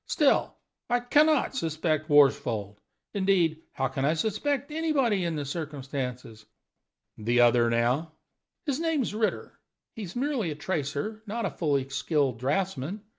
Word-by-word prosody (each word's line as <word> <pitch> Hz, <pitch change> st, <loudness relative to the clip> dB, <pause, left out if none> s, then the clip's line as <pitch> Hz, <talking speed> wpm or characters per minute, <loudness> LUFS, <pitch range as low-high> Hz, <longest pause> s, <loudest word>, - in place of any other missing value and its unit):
Still, 295 Hz, -4 st, +2 dB, 0.3 s
I 245 Hz, -, +3 dB
can 295 Hz, +5 st, +4 dB
not 305 Hz, -3 st, +1 dB
suspect 160 Hz, -, -1 dB
Worsfold. 115 Hz, -8 st, +3 dB, 0.3 s
Indeed, 185 Hz, -6 st, +2 dB
how 135 Hz, -, 0 dB
can 135 Hz, 0 st, -3 dB
I 155 Hz, +4 st, +2 dB
suspect 275 Hz, -, -1 dB
anybody 280 Hz, -, +1 dB
in 165 Hz, -1 st, -1 dB
the 145 Hz, -2 st, -3 dB
circumstances?" 135 Hz, -7 st, -5 dB, 0.7 s
"The 120 Hz, +3 st, +1 dB
other, 120 Hz, 0 st, +5 dB
now?" 125 Hz, +7 st, +1 dB, 0.5 s
"His 285 Hz, -2 st, -1 dB
name's 320 Hz, -10 st, 0 dB
Ritter. 215 Hz, 0 st, -2 dB, 0.4 s
He 225 Hz, -, -7 dB
is 185 Hz, -4 st, -7 dB
merely 255 Hz, -, -1 dB
a 150 Hz, -, -4 dB
tracer, 160 Hz, +6 st, -3 dB
not 225 Hz, +3 st, -2 dB
a -, -, -1 dB
fully 140 Hz, -5 st, 0 dB
skilled 140 Hz, -3 st, 0 dB
draughtsman. 160 Hz, -, -2 dB
160 Hz, 140 wpm, -27 LUFS, 135-220 Hz, 0.7 s, other